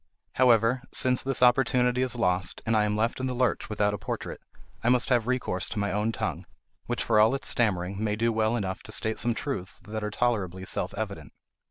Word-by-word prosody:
However, 125 Hz, 0 st, +4 dB
since 125 Hz, -1 st, +3 dB
this 135 Hz, -1 st, +1 dB
opportunity 125 Hz, 0 st, +3 dB
is 130 Hz, -2 st, 0 dB
lost, 90 Hz, -5 st, 0 dB
and 115 Hz, -, +1 dB
I 105 Hz, -1 st, +3 dB
am 105 Hz, 0 st, -1 dB
left 115 Hz, +4 st, 0 dB
in 130 Hz, -, -1 dB
the 125 Hz, -, -3 dB
lurch 125 Hz, 0 st, 0 dB
without 105 Hz, -1 st, +1 dB
a 105 Hz, -, -4 dB
portrait, -, -, -5 dB, 0.4 s
I 120 Hz, -, +3 dB
must 125 Hz, +1 st, +2 dB
have 120 Hz, -3 st, +2 dB
recourse 125 Hz, -8 st, -1 dB
to -, -, -6 dB
my 100 Hz, 0 st, 0 dB
own 105 Hz, +2 st, 0 dB
tongue, -, -, -4 dB, 0.4 s
which, -, -, -1 dB
for 105 Hz, -, +3 dB
all 110 Hz, +5 st, +5 dB
its 135 Hz, -, -1 dB
stammering, 100 Hz, -3 st, 0 dB
may 105 Hz, -1 st, 0 dB
do 115 Hz, +1 st, +1 dB
well 110 Hz, +1 st, +1 dB
enough 95 Hz, -4 st, -3 dB
to 110 Hz, -, -11 dB
state 110 Hz, +1 st, -1 dB
some 120 Hz, -1 st, 0 dB
truths 105 Hz, -7 st, -4 dB
that 110 Hz, 0 st, -4 dB
are 105 Hz, -, -1 dB
tolerably 100 Hz, -6 st, -1 dB
self -, -, -2 dB
evident. -, -, -5 dB
110 Hz, 215 wpm, -27 LUFS, 105-125 Hz, 0.4 s, all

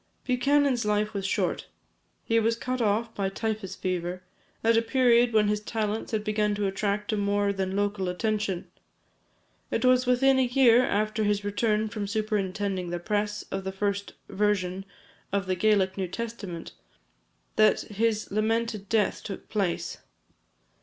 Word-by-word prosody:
Buchanan's 270 Hz, 0 st, +2 dB
life 210 Hz, 0 st, 0 dB
was 200 Hz, -1 st, -2 dB
short. -, -, -1 dB, 0.6 s
He 230 Hz, 0 st, +2 dB
was 225 Hz, +1 st, +2 dB
cut 255 Hz, +2 st, -3 dB
off 225 Hz, +1 st, +1 dB
by 195 Hz, -1 st, -1 dB
typhus 215 Hz, -1 st, -3 dB
fever, 180 Hz, 0 st, -3 dB, 0.4 s
at 230 Hz, +1 st, +4 dB
a 225 Hz, -, +5 dB
period 240 Hz, 0 st, +4 dB
when 215 Hz, -2 st, +3 dB
his 210 Hz, 0 st, +1 dB
talents 215 Hz, 0 st, -3 dB
had 215 Hz, -2 st, -1 dB
begun 210 Hz, -1 st, 0 dB
to 205 Hz, 0 st, -1 dB
attract 205 Hz, +2 st, -1 dB
a -, -, 0 dB
more 205 Hz, 0 st, +1 dB
than 190 Hz, -1 st, -2 dB
local 200 Hz, -2 st, 0 dB
attention. 205 Hz, -1 st, -1 dB, 1.0 s
It -, -, 0 dB
was 255 Hz, 0 st, +4 dB
within 265 Hz, +2 st, +4 dB
a 255 Hz, -, +3 dB
year 245 Hz, -1 st, +5 dB
after 215 Hz, 0 st, 0 dB
his 205 Hz, -1 st, +1 dB
return 210 Hz, +1 st, 0 dB
from 210 Hz, -1 st, -4 dB
superintending 200 Hz, -3 st, -1 dB
the 175 Hz, -, -2 dB
press 210 Hz, +3 st, -2 dB
of 195 Hz, -, -3 dB
the 190 Hz, -, -3 dB
first 200 Hz, +1 st, -2 dB
version 195 Hz, -2 st, 0 dB, 0.5 s
of 200 Hz, 0 st, 0 dB
the 185 Hz, -, 0 dB
Gaelic 190 Hz, 0 st, +2 dB
New 190 Hz, -, -1 dB
Testament, 200 Hz, -4 st, -6 dB, 0.8 s
that 215 Hz, 0 st, +4 dB
his 215 Hz, +1 st, -1 dB
lamented 215 Hz, -1 st, -1 dB
death 215 Hz, -3 st, +1 dB
took 195 Hz, -, -7 dB
place. 195 Hz, -5 st, -2 dB
210 Hz, 155 wpm, -27 LUFS, 195-225 Hz, 1.0 s, a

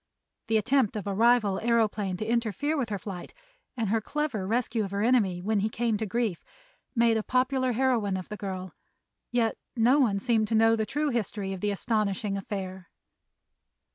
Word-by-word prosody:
The 225 Hz, -1 st, +3 dB
attempt 245 Hz, 0 st, +2 dB
of 210 Hz, -, -4 dB
a 200 Hz, -, -2 dB
rival 220 Hz, -2 st, +3 dB
aëroplane 215 Hz, -5 st, +1 dB
to 215 Hz, -, -3 dB
interfere 235 Hz, +6 st, 0 dB
with 260 Hz, -7 st, -1 dB
her 205 Hz, -, -2 dB
flight 190 Hz, -, -8 dB, 0.4 s
and 225 Hz, -4 st, -1 dB
her 225 Hz, +1 st, +1 dB
clever 270 Hz, -7 st, -2 dB
rescue 230 Hz, 0 st, 0 dB
of 195 Hz, -, -4 dB
her 200 Hz, +1 st, -1 dB
enemy 205 Hz, -8 st, +2 dB
when 215 Hz, +1 st, +1 dB
he 210 Hz, +2 st, 0 dB
came 230 Hz, 0 st, 0 dB
to 220 Hz, 0 st, -3 dB
grief 220 Hz, -4 st, -1 dB, 0.5 s
made 230 Hz, -1 st, +4 dB
a -, -, 0 dB
popular 255 Hz, +2 st, +1 dB
heroine 230 Hz, -6 st, +1 dB
of 185 Hz, -, -7 dB
the 210 Hz, -, -6 dB
girl, 190 Hz, -3 st, -5 dB, 0.6 s
yet 235 Hz, -2 st, +1 dB, 0.2 s
no 245 Hz, +5 st, +4 dB
one 215 Hz, -8 st, +2 dB
seemed 220 Hz, -1 st, +1 dB
to 225 Hz, -, 0 dB
know 225 Hz, +1 st, +5 dB
the 220 Hz, -1 st, -1 dB
true 295 Hz, +6 st, 0 dB
history 205 Hz, -5 st, -2 dB
of 190 Hz, -, -7 dB
the 210 Hz, -, 0 dB
astonishing 205 Hz, 0 st, -1 dB
affair. 190 Hz, -2 st, -5 dB
220 Hz, 185 wpm, -28 LUFS, 200-240 Hz, 0.6 s, know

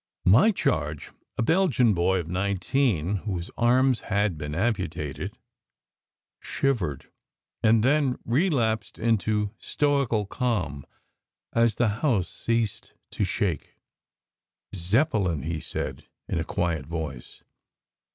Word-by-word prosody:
My 110 Hz, -, +6 dB
charge, 80 Hz, -, -1 dB, 0.3 s
a -, -, +1 dB
Belgian 140 Hz, -, +3 dB
boy 95 Hz, +1 st, +2 dB
of 85 Hz, -3 st, -3 dB
nineteen 100 Hz, -, 0 dB
whose 90 Hz, -3 st, -4 dB
arms 125 Hz, +1 st, +3 dB
had 100 Hz, -4 st, 0 dB
been 75 Hz, 0 st, -5 dB
amputated, 90 Hz, -, -2 dB, 1.0 s
shivered 100 Hz, -, -2 dB, 0.5 s
and 110 Hz, 0 st, +4 dB
then 135 Hz, -1 st, +2 dB
relapsed 115 Hz, -, +1 dB
into 110 Hz, -2 st, +1 dB
stoical 140 Hz, -7 st, +1 dB
calm 95 Hz, -, -2 dB, 0.7 s
as 115 Hz, -2 st, +3 dB
the 120 Hz, -3 st, +2 dB
house 115 Hz, -, +1 dB
ceased 115 Hz, -3 st, -2 dB, 0.2 s
to -, -, -1 dB
shake. 95 Hz, -3 st, -2 dB, 1.0 s
"Zeppelin," 95 Hz, -, +1 dB
he 80 Hz, 0 st, -2 dB
said, -, -, -5 dB, 0.2 s
in -, -, -1 dB
a -, -, 0 dB
quiet 80 Hz, -5 st, -2 dB
voice. 80 Hz, -6 st, -6 dB
105 Hz, 105 wpm, -26 LUFS, 85-120 Hz, 1.0 s, My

